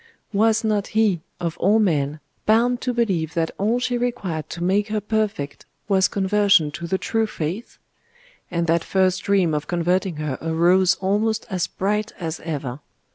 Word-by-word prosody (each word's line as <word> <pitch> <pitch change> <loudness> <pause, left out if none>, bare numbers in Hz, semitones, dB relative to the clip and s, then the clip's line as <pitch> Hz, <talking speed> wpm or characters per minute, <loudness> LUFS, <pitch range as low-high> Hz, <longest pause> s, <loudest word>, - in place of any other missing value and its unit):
Was 220 +2 +3
not 210 -2 0
he, 205 -7 +3 0.2
of 170 -2 -3
all 205 +4 +4
men, 155 -8 +1 0.3
bound 240 +3 +3
to 250 - -1
believe 190 -9 0
that 165 -1 0
all 220 +5 +1
she 245 -1 -1
required 200 -11 -3
to 170 - -5
make 200 +3 +2
her 215 0 -1
perfect 210 -9 -2 0.2
was 190 -2 +4
conversion 200 -5 +3
to 170 +3 -6
the 190 - 0
true 225 +3 0
faith?.... 185 +4 -5 0.7
And 170 -1 -1
that 165 0 +2
first 185 -1 +1
dream 190 -5 +2
of 150 0 -2
converting 175 +1 0
her 150 -3 -3
arose 175 +3 +3
almost 215 +3 0
as 185 -2 0
bright 210 +3 -2
as 165 -2 -4
ever.... 140 -5 -4
190 Hz, 165 wpm, -22 LUFS, 165-215 Hz, 0.7 s, all